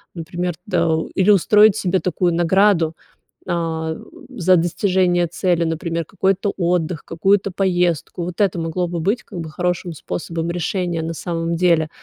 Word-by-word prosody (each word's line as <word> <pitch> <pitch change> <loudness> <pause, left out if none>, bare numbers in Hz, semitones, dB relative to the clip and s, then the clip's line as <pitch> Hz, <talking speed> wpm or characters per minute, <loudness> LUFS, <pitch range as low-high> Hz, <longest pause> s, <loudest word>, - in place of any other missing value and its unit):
Например, 175 +1 -3
да, - - +1 0.3
или 190 +2 +2
устроить 210 +2 +5
себе 185 0 +1
такую 180 -1 0
награду, 175 -1 +3 0.6
а, 160 -2 -2 0.3
за 185 -6 +3
достижение 175 +1 +1
цели, 175 0 0
например, 165 0 -2
какой-то 195 +4 0
отдых, 175 -2 0
какую-то 195 +4 +1
поездку. 175 -3 0
Вот 175 +2 -6
это 185 -3 +1
могло 170 +2 -2
бы 170 -1 -3
быть 205 +9 0
как 185 -5 -7
бы 160 - -6
хорошим 175 0 -2
способом 165 +2 -4
решения, 175 0 -2
на 165 +1 -4
самом 165 0 -3
деле, 170 -3 +2
175 Hz, 145 wpm, -20 LUFS, 165-185 Hz, 0.6 s, устроить